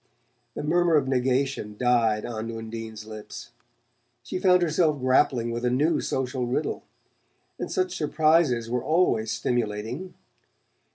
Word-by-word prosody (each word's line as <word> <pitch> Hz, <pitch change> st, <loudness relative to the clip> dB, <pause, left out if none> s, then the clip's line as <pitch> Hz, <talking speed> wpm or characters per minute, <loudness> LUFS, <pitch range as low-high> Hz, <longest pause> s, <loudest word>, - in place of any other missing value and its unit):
The -, -, -4 dB
murmur 170 Hz, +2 st, +3 dB
of 140 Hz, -3 st, +2 dB
negation 130 Hz, -4 st, 0 dB
died 115 Hz, -3 st, +2 dB
on 115 Hz, -1 st, -5 dB
Undine's 110 Hz, -1 st, -7 dB
lips. 110 Hz, -1 st, -9 dB, 0.7 s
She 185 Hz, -, -4 dB
found 180 Hz, -1 st, +4 dB
herself 155 Hz, -2 st, +2 dB
grappling 130 Hz, -2 st, +2 dB
with 120 Hz, +1 st, -4 dB
a 125 Hz, -, +2 dB
new 150 Hz, +6 st, +2 dB
social 130 Hz, -1 st, -2 dB
riddle, 125 Hz, -, -2 dB, 0.8 s
and -, -, -4 dB
such 185 Hz, 0 st, -1 dB
surprises 155 Hz, -6 st, +2 dB
were 120 Hz, +1 st, -2 dB
always 155 Hz, -10 st, +2 dB
stimulating. 120 Hz, -, -2 dB
125 Hz, 125 wpm, -26 LUFS, 115-155 Hz, 0.8 s, found